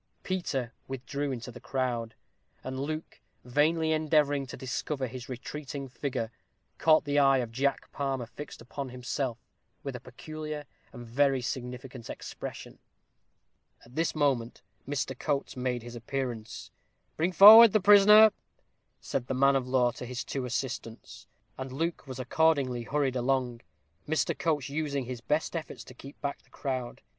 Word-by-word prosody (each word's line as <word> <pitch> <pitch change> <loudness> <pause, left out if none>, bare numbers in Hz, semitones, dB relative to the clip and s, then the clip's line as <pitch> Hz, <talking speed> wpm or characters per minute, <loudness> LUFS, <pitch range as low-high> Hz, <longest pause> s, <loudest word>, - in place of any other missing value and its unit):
Peter 135 -10 -2
withdrew 135 +2 -3
into 125 -1 -5
the 125 - -11
crowd; 120 -4 -2 0.5
and 130 0 -5
Luke, 155 +3 -5 0.2
vainly 160 +5 +2
endeavoring 150 -3 +2
to - - -8
discover 130 +1 -3
his 130 +1 -8
retreating 140 +2 -6
figure, 125 -3 -3 0.5
caught 155 -1 +5
the 145 0 +2
eye 135 -1 +5
of 120 -3 -2
Jack 135 +4 -1
Palmer 135 -3 -2
fixed 125 +5 -10
upon 135 +2 -6
himself, 125 0 -3 0.5
with 140 -2 -4
a - - -5
peculiar 150 +4 -7 0.3
and 120 -2 -9
very 135 +3 +2
significant 125 0 -6
expression. - - -8 1.1
At 120 - -18
this 165 +3 0
moment 135 -6 0 0.2
Mr. 135 -2 -2
Coates 145 -2 -1
made 125 -2 -2
his 120 0 -9
appearance. 120 -2 -5 0.4
"Bring 170 +4 +1
forward 215 +5 +11
the 215 - +4
prisoner," 210 +2 +8 0.7
said 125 -2 -3
the 130 - -2
man 140 +1 +4
of 130 -2 0
law 125 -1 +3
to 125 - -8
his 125 -2 -4
two 130 +1 -4
assistants; 120 -2 -5 0.3
and 130 0 -5
Luke 160 +3 -3
was 130 -1 -6
accordingly 130 -1 +2
hurried 135 +1 -1
along, 125 -1 0 0.5
Mr. 160 +1 +1
Coates 150 -5 0
using 140 -2 -2
his 125 -1 -6
best 150 +8 -1
efforts 165 - -5
to - - -13
keep 135 +3 -12
back 140 -1 -3
the - - -30
crowd. 130 -3 -4
135 Hz, 150 wpm, -29 LUFS, 125-150 Hz, 1.1 s, forward